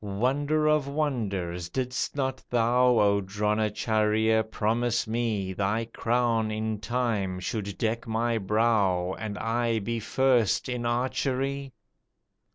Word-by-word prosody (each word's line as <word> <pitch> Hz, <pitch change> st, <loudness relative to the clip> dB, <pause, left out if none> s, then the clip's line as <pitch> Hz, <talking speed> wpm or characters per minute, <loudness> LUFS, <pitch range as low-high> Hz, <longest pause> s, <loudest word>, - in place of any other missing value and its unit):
"Wonder 135 Hz, +9 st, 0 dB
of 150 Hz, -2 st, +3 dB
wonders! 100 Hz, -, -2 dB
Didst 130 Hz, +7 st, -2 dB
not 130 Hz, -2 st, -2 dB
thou 120 Hz, +1 st, +3 dB
O 100 Hz, -1 st, +3 dB
Dronacharjya, 110 Hz, +2 st, +1 dB
promise 115 Hz, +2 st, 0 dB
me 110 Hz, -4 st, -1 dB
Thy 100 Hz, +4 st, 0 dB
crown 115 Hz, -2 st, +1 dB
in 110 Hz, 0 st, -2 dB
time 105 Hz, -4 st, -1 dB
should 100 Hz, +1 st, -4 dB
deck 115 Hz, 0 st, -1 dB
my 115 Hz, +1 st, 0 dB
brow 100 Hz, -4 st, +1 dB
And 105 Hz, -2 st, -4 dB
I 115 Hz, +1 st, 0 dB
be 115 Hz, +2 st, -2 dB
first 120 Hz, -2 st, +2 dB
in 125 Hz, -2 st, -2 dB
archery? 130 Hz, +2 st, -1 dB
115 Hz, 115 wpm, -27 LUFS, 105-125 Hz, -, of